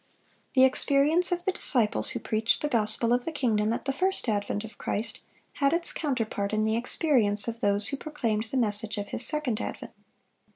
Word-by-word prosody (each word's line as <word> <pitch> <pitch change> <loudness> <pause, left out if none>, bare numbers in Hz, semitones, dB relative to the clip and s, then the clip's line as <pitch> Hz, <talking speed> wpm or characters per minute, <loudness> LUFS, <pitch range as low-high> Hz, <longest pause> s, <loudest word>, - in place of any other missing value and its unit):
The 260 - +5
experience 285 +6 +2
of 350 0 -3
the 380 - 0
disciples 240 - +4
who - - -4
preached 220 +4 -1
the - - 0
"gospel 230 -2 0
of 245 0 -1
the 330 - -5
kingdom" 225 -8 -1
at 230 - -5
the 275 - -2
first 375 0 0
advent 205 -1 -3
of 220 -2 -13
Christ, 215 +4 -3 0.4
had 275 +1 +2
its 340 0 +5
counterpart 225 -8 -4
in 215 0 -1
the 220 0 -1
experience 235 - +3
of 230 0 -6
those 205 0 +1
who 275 - -5
proclaimed 230 -8 -4
the 245 +4 -5
message 215 -2 -1
of 205 0 -6
His - - -2
second 265 -4 0
advent. - - -8
235 Hz, 195 wpm, -25 LUFS, 215-280 Hz, 0.4 s, The